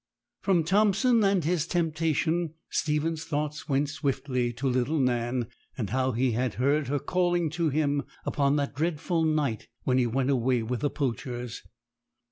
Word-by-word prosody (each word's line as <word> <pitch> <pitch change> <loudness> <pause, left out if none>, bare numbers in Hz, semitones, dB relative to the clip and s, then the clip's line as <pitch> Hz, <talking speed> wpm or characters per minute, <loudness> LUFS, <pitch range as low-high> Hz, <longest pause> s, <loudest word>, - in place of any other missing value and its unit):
From 185 -4 +3
Thompson 210 +6 +3
and 195 -3 +3
his 165 0 0
temptation, 165 -1 0 0.2
Stephen's 155 +1 0
thoughts 150 0 -3
went 140 +1 +2
swiftly 135 -4 -1
to 130 +4 -2
little 130 +5 +1
Nan, 120 -2 +1 0.3
and 105 -7 -3
how 130 +1 +1
he 125 +2 +1
had 120 0 -1
heard 140 +5 +1
her 145 +2 0
calling 175 0 +1
to 165 -1 0
him 145 -1 +1 0.2
upon 140 -1 +2
that 145 -1 -1
dreadful 165 +2 0
night 150 -8 0 0.2
when 130 0 +2
he 125 - +2
went 130 +3 +1
away 125 -2 +2
with 120 +2 -2
the 145 - +1
poachers. 125 -3 -3
145 Hz, 155 wpm, -28 LUFS, 130-165 Hz, 0.3 s, From